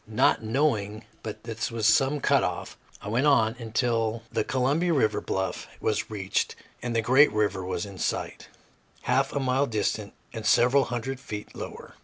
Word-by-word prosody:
Not 110 +3 +3
knowing 110 -3 0 0.2
but 110 - -7
this 115 0 -3
was 115 -2 -2
some 135 +6 +4
cut - - +3
off, - - -3 0.3
I - - -7
went 120 +7 +2
on 115 -6 +4
until 115 -1 0
the - - 0
Columbia 145 +7 +1
River 130 -8 +2
bluff 95 -1 -3
was 110 +1 -1
reached 100 -3 -1 0.3
and 120 -1 -3
the 115 - +2
great 130 +6 +6
river 100 -3 0
was 90 0 -3
in 100 -2 -10
sight, - - -3 0.6
half - - +2
a - - -1
mile 135 +1 +1
distant 105 -1 -2 0.2
and 110 -2 -5
several 125 +4 +4
hundred 125 +2 -4
feet 105 -5 -7
lower. - - -8
115 Hz, 170 wpm, -27 LUFS, 110-130 Hz, 0.6 s, great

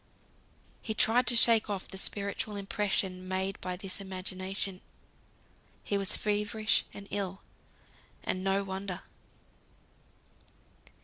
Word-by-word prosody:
He 220 - -3
tried 245 +4 +4
to 240 - +4
shake 230 -1 +7
off 195 -2 -3
the 190 - -8
spiritual 200 +1 -2
impression 195 -2 -1
made 190 +1 -2
by 180 -1 -3
this 195 +1 -5
imagination. 190 0 -4 1.0
He 205 - -1
was 195 -1 +1
feverish 210 +1 +2
and 200 0 -9
ill, 195 -2 -3 0.8
and 185 - -1
no 195 +1 +2
wonder. 190 -1 -4
195 Hz, 110 wpm, -31 LUFS, 190-210 Hz, 1.0 s, shake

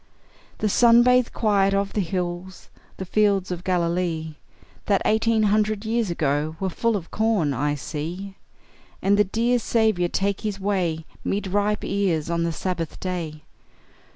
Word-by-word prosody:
The 215 - 0
sun 235 +3 +6
bathed 250 0 +3
quiet 200 -3 +2
of 200 0 -1
the 210 - +1
hills, 180 0 -4 0.3
The 190 - -5
fields 200 -1 +1
of 180 0 -4
Galilee, 170 -3 -1 0.5
That 200 -2 +2
eighteen 220 0 +2
hundred 210 0 +1
years 225 -2 0
ago 150 -1 -1
Were 190 -1 -2
full 230 +5 0
of 175 -5 -5
corn, 210 -10 +1
I 145 +3 0
see; 170 +7 -6 0.7
And 200 +1 +4
the 210 - +5
dear 235 +5 +1
Saviour 220 -7 +1
take 195 +1 -1
his 205 -2 -3
way 180 -5 -1 0.2
'Mid 200 +1 -1
ripe 205 +2 0
ears 170 -6 0
on 170 0 0
the 170 0 0
Sabbath 165 -1 -4
day. 165 -5 -4
195 Hz, 155 wpm, -24 LUFS, 170-210 Hz, 0.7 s, sun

